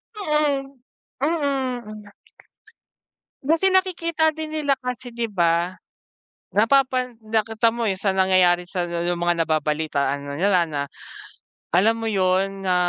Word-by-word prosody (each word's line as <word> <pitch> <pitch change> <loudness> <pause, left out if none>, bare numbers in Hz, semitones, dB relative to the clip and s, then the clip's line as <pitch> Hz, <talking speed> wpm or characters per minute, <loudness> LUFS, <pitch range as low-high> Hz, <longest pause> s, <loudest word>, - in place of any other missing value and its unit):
Mm, 300 -7 0 0.5
mm. 255 -9 -2 1.3
Kasi 325 +7 +3
nakikita 335 -4 +2
din 315 0 -6
nila 285 -3 +1
kasi 250 -1 -5
di 235 0 -3
ba? 175 -2 +1 0.8
Napapan 255 +2 +2
nakita 225 +1 +1
mo 235 -2 -1
yung 190 - 0
sa 195 0 +1
nangyayari 185 -2 +3
sa 180 -1 -2
yung 175 0 -2
mga 170 -1 +1
nababalitaan 150 -2 0
na 140 - -4
nila 185 +2 +3
na, 145 -2 -2 0.9
alam 200 +7 +4
mo 225 -1 -3
yun 195 0 0
na 185 - +3
215 Hz, 120 wpm, -23 LUFS, 180-275 Hz, 1.3 s, alam